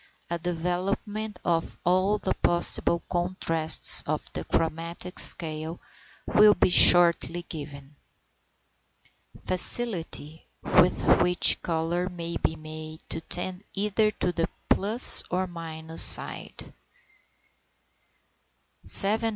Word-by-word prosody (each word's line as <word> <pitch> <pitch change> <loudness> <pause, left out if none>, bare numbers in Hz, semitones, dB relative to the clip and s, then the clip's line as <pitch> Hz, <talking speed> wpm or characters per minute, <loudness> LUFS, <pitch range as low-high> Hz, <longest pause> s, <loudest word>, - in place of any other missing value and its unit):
A 170 - -4
development 185 +5 -6
of 165 -1 -4
all 185 +4 -1
the 190 - -4
possible 170 0 -1
contrasts 175 -3 +2
of - - -6
the - - -6
chromatic 165 +3 -5
scale 160 0 +2 0.5
will 210 0 +2
be - - -1
shortly 175 -1 +5
given. 145 -3 -12 1.5
FACILITY 180 -6 -1 0.2
WITH 180 0 0 0.2
WHICH 180 0 +3
COLOUR 170 +2 -4
MAY 170 -2 -9
BE 160 - -4
MADE 155 0 -12
TO - - -7
TEND 180 +3 -6
EITHER 210 +2 -1
TO 180 - -4
THE 165 -1 -4 0.2
PLUS 215 +6 +2
OR 185 +1 -3
MINUS 165 -2 0
SIDE. - - +4
175 Hz, 95 wpm, -23 LUFS, 160-185 Hz, 1.5 s, shortly